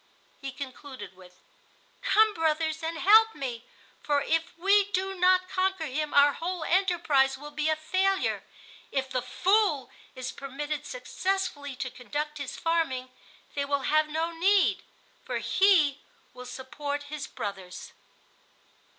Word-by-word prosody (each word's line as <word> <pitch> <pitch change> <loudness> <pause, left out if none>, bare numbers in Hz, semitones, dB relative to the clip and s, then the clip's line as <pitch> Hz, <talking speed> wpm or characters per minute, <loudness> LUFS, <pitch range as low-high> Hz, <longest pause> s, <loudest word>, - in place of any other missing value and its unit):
He 275 -1 -5
concluded 260 -6 -9
with: 180 -1 -17 0.6
"Come, 435 0 +4
brothers, 315 -1 0
and 325 0 -3
help 440 +5 +6
me, 245 -4 -5 0.4
for 290 -1 +1
if 325 +2 -1
we 395 +3 +4
do 385 0 -1
not 370 0 +3
conquer 375 -2 0
him 300 +2 -2
our 285 0 +6
whole 350 0 -4
enterprise 330 -8 +2
will 295 +2 -9
be 300 +1 -1
a 315 - +3
failure. 380 +5 0 0.5
If 265 -1 -2
the 255 - 0
Fool 360 - +1 0.2
is 255 0 -4
permitted 290 +2 -5
successfully 380 - -3
to 255 0 -4
conduct 300 +4 -4
his 280 -2 -5
farming, 320 -7 0 0.4
they 285 - -1
will 280 0 0
have 310 0 +4
no 320 +2 -1
need, 385 +4 +3 0.4
for - - -3
he 325 -8 +3 0.3
will 250 0 -10
support 285 +3 -5
his 300 -2 -4
brothers." 190 -3 -7
305 Hz, 135 wpm, -28 LUFS, 270-370 Hz, 0.6 s, help